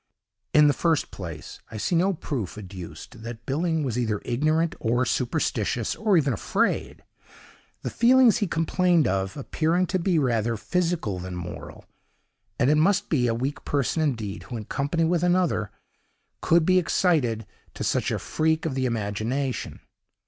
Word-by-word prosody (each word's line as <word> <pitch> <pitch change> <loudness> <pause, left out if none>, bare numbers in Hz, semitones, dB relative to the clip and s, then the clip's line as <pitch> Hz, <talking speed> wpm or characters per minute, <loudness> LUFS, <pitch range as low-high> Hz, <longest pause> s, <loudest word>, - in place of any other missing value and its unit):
In 150 0 +6
the 145 - +5
first 165 -1 0
place, 85 -5 -8
I 110 - -7
see 105 - -1
no 185 +4 +3
proof 130 - -4
adduced 95 0 -9
that 115 +1 -8
Billing 160 +3 0
was 125 -3 -1
either 110 -4 0
ignorant 155 +6 +1
or 120 +2 +1
superstitious, 120 -3 -1
or 210 -4 +2
even 140 -5 +2
afraid—the 105 - -1 0.9
feelings 245 -1 +5
he 205 - 0
complained 165 -2 +2
of 95 +2 -1
appearing 165 +6 0
to 185 +1 -1
be 175 -1 +1
rather 115 -5 +1
physical 155 - -1
than 90 0 -6
moral; 85 -2 -8 0.7
and 125 +4 +3
it 150 - +4
must 195 +6 +2
be 125 -6 +2
a 115 - +1
weak 130 +5 -3
person 145 +3 0
indeed, 115 -10 -2
who, 120 - -6
in 110 - -7
company 145 - -1
with 170 +1 +2
another, 175 - +1 0.7
could 165 -1 +3
be 185 +1 +5
excited 145 - +1 0.3
to - - -4
such - - 0
a - - -1
freak 160 +1 0
of 160 - -1
the 130 -1 0
imagination. 115 +4 -2
140 Hz, 155 wpm, -25 LUFS, 110-165 Hz, 0.9 s, In